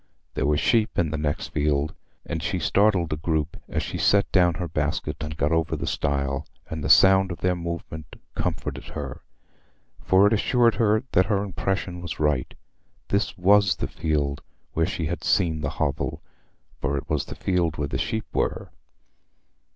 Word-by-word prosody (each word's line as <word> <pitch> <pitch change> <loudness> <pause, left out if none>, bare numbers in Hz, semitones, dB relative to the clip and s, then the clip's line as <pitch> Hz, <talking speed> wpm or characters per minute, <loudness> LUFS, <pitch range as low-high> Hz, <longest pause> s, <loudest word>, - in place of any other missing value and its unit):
There - - 0
were 75 0 +3
sheep 110 +6 +2
in 80 -4 +1
the - - -2
next 75 -1 -2
field, 75 0 0 0.3
and 80 -1 -3
she 95 +2 -1
startled 95 -3 +2
a - - -2
group 80 0 -1
as - - -1
she - - -4
set 100 0 +3
down 90 -3 +4
her 90 -1 -3
basket 75 0 -2
and 75 -1 -5
got 75 +1 +1
over 80 -2 +1
the - - -4
stile; 70 -1 -1 0.2
and 80 -2 -4
the - - -2
sound 95 0 +6
of 85 - -7
their 90 0 +2
movement 85 -2 -6 0.2
comforted - - -3
her, 70 -4 -5 0.8
for 95 +2 +4
it 105 - +4
assured 120 +2 +3
her 110 +1 +2
that 95 +1 +3
her 100 -2 +1
impression 95 -2 -3
was 85 -5 -6
right—this 75 +7 -3
was 100 +1 +4
the - - -3
field 75 -3 -1 0.3
where 80 0 +1
she 80 - -3
had 85 +3 -3
seen 80 -5 +2
the - - -1
hovel, - - -2 0.6
for 70 +1 -1
it 70 - -5
was 75 -3 -1
the - - -8
field 85 -5 0
where 75 0 -1
the - - -2
sheep 110 0 -2
were. - - -1
85 Hz, 175 wpm, -25 LUFS, 75-95 Hz, 0.8 s, sound